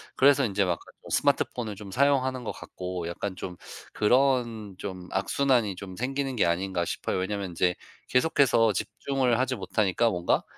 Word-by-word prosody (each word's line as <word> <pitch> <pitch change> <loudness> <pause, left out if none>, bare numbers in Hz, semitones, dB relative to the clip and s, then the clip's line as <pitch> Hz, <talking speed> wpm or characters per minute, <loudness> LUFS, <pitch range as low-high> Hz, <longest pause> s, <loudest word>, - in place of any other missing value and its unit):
'그래서 140 0 +5
인제 100 -2 +1
막간 90 -2 -1 0.2
좀 - - -12
스마트폰을 110 -4 +1
좀 100 -1 -10
사용하는 130 0 +2
것 - - -2
같고 90 -1 -6
약간 95 +2 -4
좀 90 -1 -7 0.4
그런 115 -3 +2
좀 90 -2 -6
악순환이 110 +1 +1
좀 95 -1 -8
생기는 135 +2 -2
게 - - +4
아닌가?' 85 +1 0
싶어요. - - -2
왜냐면 100 0 -2
인제 90 +1 +1 0.3
계속해서 125 -5 +4
집중을 125 +4 0
하지 130 0 +1
못하니까 105 +3 +1
뭔가 90 -3 +1
105 Hz, 350 characters per minute, -27 LUFS, 95-130 Hz, 0.4 s, 그래서